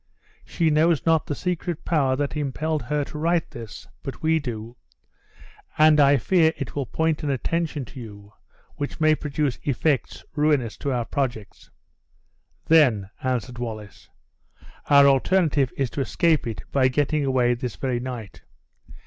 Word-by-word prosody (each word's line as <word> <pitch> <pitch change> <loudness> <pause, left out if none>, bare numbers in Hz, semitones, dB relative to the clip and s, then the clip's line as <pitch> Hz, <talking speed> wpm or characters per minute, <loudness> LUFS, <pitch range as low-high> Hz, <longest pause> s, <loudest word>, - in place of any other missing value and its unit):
She 165 -3 0
knows 155 +1 +2
not 160 -1 +2
the 145 - -2
secret 175 -1 -3
power 140 -6 +2
that 145 +2 -2
impelled 150 +2 -2
her 145 +4 -1
to 150 +2 -8
write 170 +1 0
this, 115 -6 -9
but 135 - -8
we 160 0 +3
do; 120 -4 -6 1.0
and 155 0 +6
I 140 0 +6
fear 160 0 +3
it 140 -6 -5
will 140 -3 -2
point 160 +5 0
an 150 - -2
attention 150 +1 -2
to 130 - -11
you 105 -3 -11 0.4
which 145 - -5
may 155 -1 +4
produce 150 -3 -2
effects 130 - -1
ruinous 145 -7 +1
to 140 - -3
our 120 -2 -1
projects." 120 -8 -4 1.0
"Then," 120 -12 +4
answered 125 -1 -2
Wallace, 110 -4 -7 0.8
"our 140 -1 +7
alternative 140 0 +3
is 135 -4 -1
to 140 - -3
escape 160 +1 +1
it 115 - -5
by 130 -2 +3
getting 145 +3 0
away 130 -3 +2
this 120 -1 -5
very 130 -3 -2
night. 120 -5 -7
140 Hz, 150 wpm, -24 LUFS, 120-155 Hz, 1.0 s, our